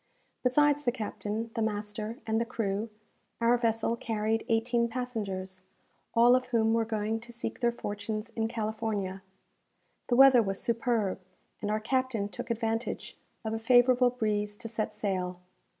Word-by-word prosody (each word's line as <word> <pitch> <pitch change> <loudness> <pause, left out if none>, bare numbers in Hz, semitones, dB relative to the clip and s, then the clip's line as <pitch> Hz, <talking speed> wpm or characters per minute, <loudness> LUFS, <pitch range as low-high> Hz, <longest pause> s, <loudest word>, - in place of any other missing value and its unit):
Besides 290 +3 +3
the 245 - +2
captain, 220 -1 -4
the 230 - -2
master, 215 +1 -2
and 225 0 +1
the - - +3
crew, 220 -2 -2 0.5
our 235 +1 +4
vessel 230 -1 +1
carried 225 -1 -1
eighteen 235 +1 +2
passengers, 205 -7 -4 0.5
all 240 +2 +7
of 255 0 0
whom 225 -2 +2
were 230 0 +2
going 220 0 -1
to 240 +1 -11
seek 235 -1 -5
their 240 -2 +2
fortunes 215 0 -4
in 225 -1 -1
California. 215 -4 -3 0.9
The 240 - +2
weather 265 -1 +8
was 195 -2 -2
superb, 230 -5 0 0.4
and 205 - -2
our 215 +1 +1
captain 235 -3 0
took 205 +5 -7
advantage 225 0 -2 0.3
of 220 - -1
a 225 - -2
favourable 245 +2 +5
breeze 210 -4 -1
to 230 - -7
set 220 -1 -2
sail. 185 -3 -2
225 Hz, 150 wpm, -30 LUFS, 210-240 Hz, 0.9 s, weather